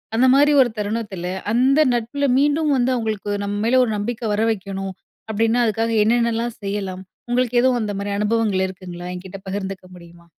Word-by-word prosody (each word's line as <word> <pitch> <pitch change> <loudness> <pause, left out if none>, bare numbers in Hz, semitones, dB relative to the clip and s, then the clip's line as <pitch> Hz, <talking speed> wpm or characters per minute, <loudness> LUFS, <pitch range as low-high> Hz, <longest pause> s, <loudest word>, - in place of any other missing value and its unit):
அந்த 245 +3 +4
மாரி 290 +2 +5
ஒரு 250 - +3
தருணத்துல, 205 -3 -3 0.3
அந்த 260 +5 +3
நட்புல 240 +4 -1
மீண்டும் 295 +2 +2
வந்து 250 +1 +2
அவங்களுக்கு 220 -4 -3
நம்ம 200 0 -3
மேல 245 +3 +3
ஒரு 225 - -2
நம்பிக்க 225 +3 -3
வரவைக்கணும், 195 -3 -2 0.4
அப்படீன்னா 225 +3 +1
அதுக்காக 225 +1 0
என்னென்னல்லாம் 235 +1 0
செய்யலாம்? 195 -2 -4 0.3
உங்களுக்கு 245 0 0
எதுவும் 255 0 +3
அந்த 210 -1 -2
மாரி 200 0 -3
அனுபவங்கள் 210 -2 +1
இருக்குங்களா? 180 -2 -9
எங்கிட்ட 185 +1 -8
பகிர்ந்துக்க 190 -1 -5
முடியுமா? 170 -1 -15
220 Hz, 155 wpm, -21 LUFS, 195-240 Hz, 0.4 s, மாரி